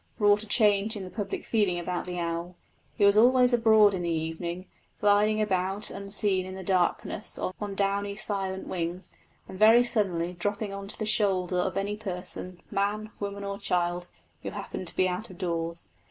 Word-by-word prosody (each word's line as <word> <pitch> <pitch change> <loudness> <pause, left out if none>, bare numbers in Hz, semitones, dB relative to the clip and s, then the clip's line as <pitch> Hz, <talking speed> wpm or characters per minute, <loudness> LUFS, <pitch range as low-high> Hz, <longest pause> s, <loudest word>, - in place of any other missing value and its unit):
wrought 205 -1 +4
a 215 - -9
change 210 0 +3
in 200 - -5
the 185 - -8
public 205 -3 -4
feeling 205 -6 +1
about 175 +1 -3
the 180 -1 -5
owl. 170 +1 -3 0.4
He 205 - +4
was 200 0 +6
always 250 +2 +5
abroad 220 -3 +5
in 185 - -2
the 170 - -2
evening, 165 +2 -3 0.3
gliding 210 +1 +3
about 195 -1 0
unseen 200 -1 0
in 185 0 -7
the 190 - -7
darkness 185 -1 0
on 200 +2 -4
downy 200 0 0
silent 195 -2 -2
wings, 175 +1 -4 0.4
and 190 - -9
very 225 +3 +7
suddenly 185 -8 0
dropping 205 +3 -3
on 195 0 -6
to - - 0
the 215 - -2
shoulder 190 -4 +1
of 180 +1 0
any 205 +1 -1
person 180 -3 -6
man, 210 +2 -1
woman, 200 0 -4
or 200 0 -4
child 175 -2 0 0.3
who - - -4
happened 185 - -6
to - - -4
be 185 - +3
out 185 +6 -4
of 185 - -12
doors. 170 -2 -3
195 Hz, 185 wpm, -28 LUFS, 180-210 Hz, 0.4 s, very